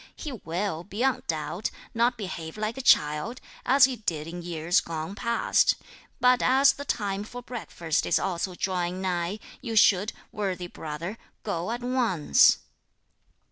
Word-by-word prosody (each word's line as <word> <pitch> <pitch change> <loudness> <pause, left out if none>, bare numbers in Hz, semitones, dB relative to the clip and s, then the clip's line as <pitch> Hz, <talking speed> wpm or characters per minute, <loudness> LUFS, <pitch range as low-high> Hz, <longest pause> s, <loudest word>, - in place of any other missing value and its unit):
He 305 - -6
will, 180 -5 -3
beyond 240 +7 -1
doubt, 165 +5 -2 0.2
not 240 +2 +2
behave 180 -4 -6
like 215 +2 -2
a 270 - -4
child, 150 - +3 0.3
as 265 +2 +6
he 260 -2 -3
did 165 -8 -2
in 175 +2 -6
years 170 0 +1
gone 160 +2 -5
past. 235 +2 +2 0.4
But 250 0 +4
as 270 +2 +5
the 285 - -8
time 200 -5 -1
for 245 +3 -9
breakfast 175 -10 -2
is - - +3
also 180 0 -2
drawing 180 -1 -1
nigh, 180 +1 -1 0.2
you 230 -4 -4
should, 205 0 +5 0.2
worthy 190 -4 -3
brother, 170 +5 -6 0.2
go 180 -2 -2
at 240 +1 -3
once." 235 - +4
195 Hz, 145 wpm, -27 LUFS, 170-235 Hz, 0.4 s, as